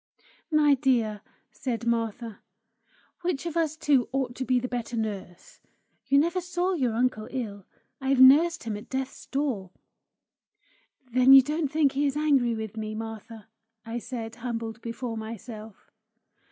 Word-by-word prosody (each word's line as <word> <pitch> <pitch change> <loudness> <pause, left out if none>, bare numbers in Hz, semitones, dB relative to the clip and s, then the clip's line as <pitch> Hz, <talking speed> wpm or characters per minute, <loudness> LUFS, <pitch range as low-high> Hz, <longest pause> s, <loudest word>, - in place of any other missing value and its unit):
"My 305 -2 +5
dear," 240 -6 +1 0.3
said 235 -3 -4
Martha, 230 -1 -2 0.8
"which 345 -4 -2
of 335 -1 -4
us 315 -2 0
two 280 -5 +2
ought 260 -2 -1
to 260 - -2
be 255 -1 +2
the 250 - -3
better 240 -1 -4
nurse? 200 -5 -5 0.5
You 280 +1 +4
never 340 +5 +2
saw 360 +1 -1
your 255 -9 0
uncle 235 -3 0
ill; 205 -7 -5 0.3
I've 265 0 +1
nursed 310 +6 +7
him 225 -2 -3
at 205 - -9
death's 265 0 -4
door!" 265 -10 -2 1.4
"Then 255 +2 +6
you 270 -1 +10
don't 300 +1 -2
think 300 -3 +3
he 285 +2 +1
is 280 +1 -2
angry 275 -6 +2
with 220 -1 -6
me, 215 0 -4
Martha?" 225 0 -8 0.4
I 230 +1 -4
said, 230 -2 -6
humbled 230 -2 -5
before 230 0 -5
myself. 220 -1 -9
250 Hz, 150 wpm, -27 LUFS, 225-280 Hz, 1.4 s, you